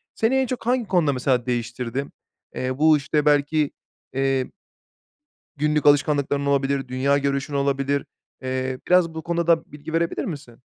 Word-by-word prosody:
Seni 225 +4 +1
en 265 0 +3
çok 240 -2 -5
hangi 245 -3 +1
konuda 170 -7 +2
mesela 125 -1 0
değiştirdi? 120 +2 -3 0.5
Eee, 130 +1 -2
bu 155 0 +5
işte 150 +1 -1
belki, 150 0 +2 0.4
eee, 135 -1 0 1.1
günlük 150 0 +1
alışkanlıkların 145 -1 +3
olabilir, 140 -1 0
dünya 135 +3 +1
görüşün 140 +1 -2
olabilir. 140 0 0 0.4
Eee, 130 0 -2
biraz 180 -3 +3
bu 160 - -5
konuda 170 +1 -1
da 165 -1 +3
bilgi 150 +2 -9
verebilir 165 0 0
misin? 140 - -7
140 Hz, 145 wpm, -23 LUFS, 135-160 Hz, 1.1 s, bu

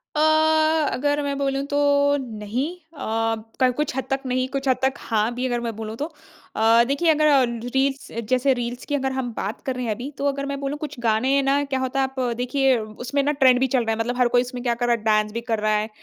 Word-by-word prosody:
अ, 300 - +1 0.7
अगर 290 +2 0
मैं 280 -1 -2
बोलूँ 275 -1 -1
तो 285 - +1 0.4
नहीं 230 +2 -3 0.3
अ, 225 +1 -1 0.2
कल 255 -1 +4
कुछ 295 -3 -1
हद 265 - -1
तक 270 0 0
नहीं 255 0 0
कुछ 275 0 -3
हद 260 - +3
तक 265 0 +2
हाँ 220 +1 -1
भी 255 +1 -2
अगर 240 -1 -1
मैं 230 -2 -4
बोलूँ 220 0 -6
तो। 295 - -2 0.5
अ, 225 +2 +5
देखिए 285 +5 +1
अगर 305 0 +3 0.5
रील्स 270 +1 0 0.2
जैसे 260 +1 +3
रील्स 240 +1 -4
की 290 - +1
अगर 265 -1 -1
हम 260 -2 -3
बात 205 +3 -3
कर 260 - -2
रहे 250 -1 -3
हैं 220 - -1
अभी 250 +5 -6
तो 280 - -3
अगर 275 0 -1
मैं 280 - -4
बोलूँ 280 +1 -3
कुछ 295 -4 -6
गाने 240 +5 +2
ना 275 +1 +2
क्या 275 -2 -2
होता 260 +1 -2
है 265 - +2
आप 265 0 -8 0.2
देखिए 265 +1 +2
उसमें 245 +6 -3
ना 295 - +2
ट्रेंड 255 -1 +6
भी 265 - +2
चल 250 -2 +1
रहा 225 - 0
है - - -8
मतलब 245 +2 -1
हर 250 - +4
कोई - - +6
इसमें 250 0 -6
क्या 240 -2 +1
कर 240 +1 -1
रहा 240 - +4
है 220 - -9
डांस 215 -1 +2
भी 235 +2 -4
कर 225 - +1
रहा 215 0 +1
है। 215 +1 -2
255 Hz, 250 wpm, -23 LUFS, 230-275 Hz, 0.7 s, ट्रेंड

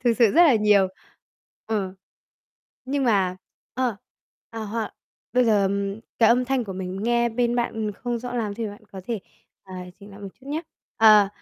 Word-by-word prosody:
thực 240 - +5
sự 240 - +6
rất 340 +4 +7
là 300 -7 +6
nhiều, 210 -3 +4 0.8
ừm, 200 -4 -2 0.9
nhưng 275 +1 -1
mà 195 -6 +2 0.4
ơ, 250 -5 0 0.5
ờ, 225 -1 -5
hoặc 220 +1 -4 0.4
bây 250 0 +4
giờ 205 -4 +3 0.5
cái 225 -2 +6
âm 245 +2 +4
thanh 260 -1 0
của 195 - -6
mình 190 +1 -5
nghe 235 0 +2
bên 240 +1 0
bạn, 235 -2 -1
ừm, 215 -2 -2
không 240 +4 -3
rõ 245 +1 -6
lắm 215 -4 -2
thì 225 +1 -3
bạn 205 +1 -11
có 190 - -7
thể, 225 -4 -2 0.4
à, 190 -1 -10 0.3
chỉnh 200 +1 -12
lại 200 +1 -12
một 200 - -6
chút 265 - -17
nhá. 305 +3 -2 0.4
Ờ, 215 -3 +7
225 Hz, 190 wpm, -24 LUFS, 200-240 Hz, 0.9 s, rất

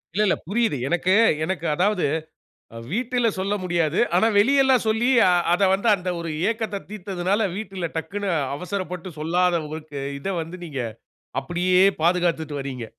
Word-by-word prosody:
இல்ல 210 - +3
இல்ல! - - +3
புரியுது. 220 -5 +1
எனக்கு, 175 +4 +1 0.3
எனக்கு 170 -1 -3
அதாவது, 185 +2 +1 0.7
அ - - -7 0.2
வீட்டில 245 +1 0
சொல்ல 195 +2 -1
முடியாது. 170 -3 0 0.2
ஆனா 220 - +4
வெளியல்லாம் 265 +2 +4
சொல்லி, 220 +3 +2 0.2
ஆ - - +5 0.2
அத 180 - 0
வந்து 200 +4 0
அந்த 180 -1 -5
ஒரு 170 -1 -4 0.2
ஏக்கத்த 220 -3 -4
தீத்ததனால, 200 0 -1
வீட்டுல 195 -5 -4
டக்ன்னு 200 +4 -3 0.3
அவசரப்பட்டு 180 +1 -5
சொல்லாத 175 +2 +1
உங்களுக்கு, 150 -1 -7 0.2
இத 140 - -6
வந்து 165 +3 -7
நீங்க 140 -6 -4 0.6
அப்படியே 180 +6 +1 0.2
பாதுகாத்துட்டு 170 -3 +1
வரீங்க. 130 -3 -5
180 Hz, 145 wpm, -23 LUFS, 165-205 Hz, 0.7 s, ஆ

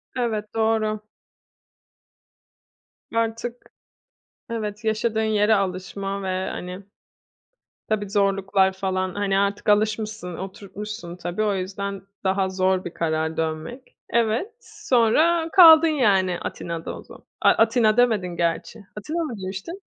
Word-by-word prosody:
Evet, 220 -4 -2
doğru. 220 -1 +1 2.1
Artık 230 +1 -1 0.9
evet, 210 -2 -4
yaşadığın 220 0 0
yere 220 0 +3
alışma 195 +1 -3
ve, 185 0 -2
hani, 180 +2 -7 1.0
tabii, 205 -2 -1
zorluklar 195 -1 +2
falan, 185 -1 -2
hani, 200 -1 0
artık 200 +1 0
alışmışsın, 215 -3 0
oturtmuşsun, 195 -1 -7
tabii. 180 +3 -3
O 210 -1 +1
yüzden 195 +1 -4 0.2
daha 190 0 +1
zor 185 0 0
bir 175 - -6
karar 160 -1 -1
dönmek. 160 - -4
Evet, 235 - 0
sonra 320 - +2
kaldın, 330 -3 +9
yani, 195 - +2
Atina'da 165 -1 -5
o - - -11
zaman. - - -15 0.2
A - - +6
Atina 225 -1 +3
demedin 225 -7 +3
gerçi. 170 +6 -2 0.2
Atina 320 +10 -3
mı 300 - -4
demiştin? 195 - -6
205 Hz, 115 wpm, -23 LUFS, 190-225 Hz, 2.1 s, kaldın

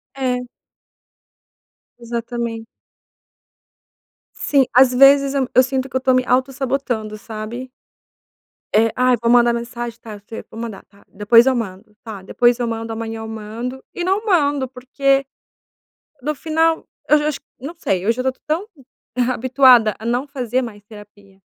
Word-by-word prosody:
É. 255 -2 -1 1.6
Exatamente. 235 -1 -4 1.7
Sim, 275 -2 +2
às 255 0 +6
vezes 275 +2 +5
eu 270 -2 0
eu 255 - +7
sinto 260 +1 -2
que 260 - -5
eu - - +4
estou 260 0 +2
me 255 0 +2
autossabotando, 255 -4 -1
sabe. 225 +4 -7 1.1
É, 225 +2 +4
"Ah, 255 0 +3
eu 245 - +2
vou 235 - +2
mandar 240 0 +5
mensagem, 235 0 -5
tá, 215 -2 -9
fe 215 +2 -9
vou - - -10
mandar, 225 -4 -6
tá, 200 0 -24
depois 210 +4 +5
eu 265 0 +2
mando, 210 -3 -5
tá, 215 -4 -8
depois 240 +5 +2
eu 240 - -1
mando 225 0 -4
amanhã". 225 0 -5
Eu 220 - -7
mando 225 +4 -6
e 355 - -3
não 385 +4 0
mando, 290 -9 +2
porque 270 +2 0 1.0
no 300 +3 -1
final 320 +2 0 0.2
eu 300 - +7
acho, 300 -2 -1 0.2
não 285 +7 -7
sei, 190 - -1
eu - - +4
já 255 - -4
tô 260 0 0
tão 325 +6 -1 0.7
habituada 255 -3 +5
a 220 - -8
não 245 +4 0
fazer 255 -3 -2
mas 210 -4 -8
terapia 205 -2 -16
245 Hz, 155 wpm, -20 LUFS, 225-265 Hz, 1.7 s, eu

